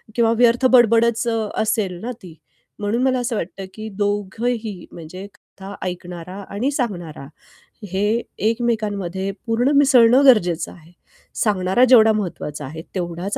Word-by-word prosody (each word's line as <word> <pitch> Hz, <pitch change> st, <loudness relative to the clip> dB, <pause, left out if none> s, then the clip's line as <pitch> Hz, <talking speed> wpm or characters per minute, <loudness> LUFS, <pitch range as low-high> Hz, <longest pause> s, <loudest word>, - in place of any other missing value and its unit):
किंवा 230 Hz, -1 st, +3 dB
व्यर्थ 240 Hz, +1 st, +3 dB
बडबड 235 Hz, -2 st, +5 dB
असेल 220 Hz, -3 st, -1 dB
ना 245 Hz, -, -4 dB
ती. 165 Hz, -3 st, -11 dB, 0.4 s
म्हणून 215 Hz, +5 st, -1 dB
मला 260 Hz, -1 st, +2 dB
असं 240 Hz, -2 st, -2 dB
वाटतं, 195 Hz, +1 st, -5 dB
की 220 Hz, +1 st, -7 dB, 0.2 s
दोघंही 205 Hz, 0 st, -3 dB
म्हणजे 175 Hz, +3 st, -9 dB
कथा 195 Hz, +1 st, -13 dB
ऐकणारा 180 Hz, 0 st, -7 dB
आणि 240 Hz, +8 st, -2 dB
सांगणारा, 175 Hz, -, -4 dB, 0.6 s
हे 210 Hz, +5 st, 0 dB, 0.3 s
एकमेकांमध्ये 205 Hz, -5 st, -2 dB, 0.2 s
पूर्ण 240 Hz, +5 st, +1 dB
मिसळणं 265 Hz, -2 st, +5 dB
गरजेचं 175 Hz, -, +3 dB
आहे. 165 Hz, 0 st, -17 dB, 0.5 s
सांगणारा 200 Hz, +2 st, +2 dB
जेवढा 225 Hz, -3 st, +7 dB
महत्त्वाचा 150 Hz, -8 st, -4 dB
आहे, 160 Hz, +4 st, -8 dB
तेवढाच 175 Hz, +2 st, -3 dB
210 Hz, 125 wpm, -20 LUFS, 185-235 Hz, 0.6 s, जेवढा